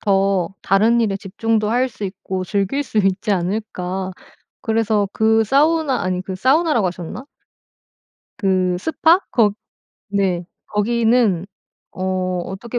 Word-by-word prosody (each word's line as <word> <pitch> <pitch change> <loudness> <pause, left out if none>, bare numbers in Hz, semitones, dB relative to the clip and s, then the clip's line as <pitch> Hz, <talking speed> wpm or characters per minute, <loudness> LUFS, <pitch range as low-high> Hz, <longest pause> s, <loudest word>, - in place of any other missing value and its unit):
더 195 -3 +1
다른 220 +4 +3
일에 205 -4 +1
집중도 215 +2 -1
할 250 +2 +2
수 225 -4 -8
있고 185 -1 -4
즐길 200 +9 -1
수 220 - -2
있지 195 +2 +1
않을까. 185 0 -2 0.5
그래서 220 -3 +1
그 220 0 +3
사우나 290 +2 +2
아니 185 0 -1
그 190 0 -5
사우나라고 265 - +2
하셨나? 180 +8 -7 1.1
그 185 -2 +1
스파? 320 - +3
거 215 -5 +3 0.6
네. 190 -3 0 0.2
거기는 225 -3 +2 0.4
어 185 - -8 0.4
어떻게 230 +6 -5
210 Hz, 235 characters per minute, -20 LUFS, 190-235 Hz, 1.1 s, 다른